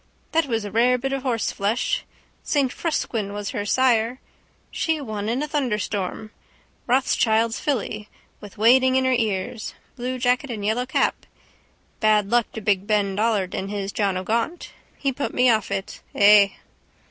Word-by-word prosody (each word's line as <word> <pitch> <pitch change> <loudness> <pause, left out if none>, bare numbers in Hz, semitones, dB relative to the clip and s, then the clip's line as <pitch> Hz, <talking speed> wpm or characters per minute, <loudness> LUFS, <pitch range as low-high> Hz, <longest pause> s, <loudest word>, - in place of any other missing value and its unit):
That 325 -2 +2
was 225 -4 -1
a 205 - -6
rare 245 +4 +3
bit 270 +2 -3
of 270 - -2
horseflesh. 235 - -1 0.4
Saint 275 -4 0
Frusquin 225 -11 -2
was 205 0 -4
her 205 -5 -3
sire. 245 -1 +2 0.5
She 320 -1 -1
won 215 -6 -4
in 250 +5 -1
a - - -3
thunderstorm, 215 - -2 0.6
Rothschild's 230 -3 +2
filly, 215 -6 -2 0.3
with 205 -2 -12
wadding 255 +4 +5
in 260 0 +2
her 260 - +3
ears. 215 -2 -2 0.2
Blue 255 0 -3
jacket 250 +2 +1
and 215 -4 -4
yellow 240 +4 0
cap. 265 - 0 0.7
Bad 210 -2 +3
luck 240 -1 +2
to 220 - -6
big 200 -1 0
Ben 205 -2 +1
Dollard 210 -3 0
and 195 - -3
his 200 -1 -3
John 200 -3 0
O'Gaunt. 230 - -2 0.3
He 275 -1 -1
put 280 - -4
me 250 0 +5
off 215 -3 0
it. 195 0 -4
Ay. 205 -1 +6
225 Hz, 160 wpm, -23 LUFS, 205-255 Hz, 0.7 s, Ay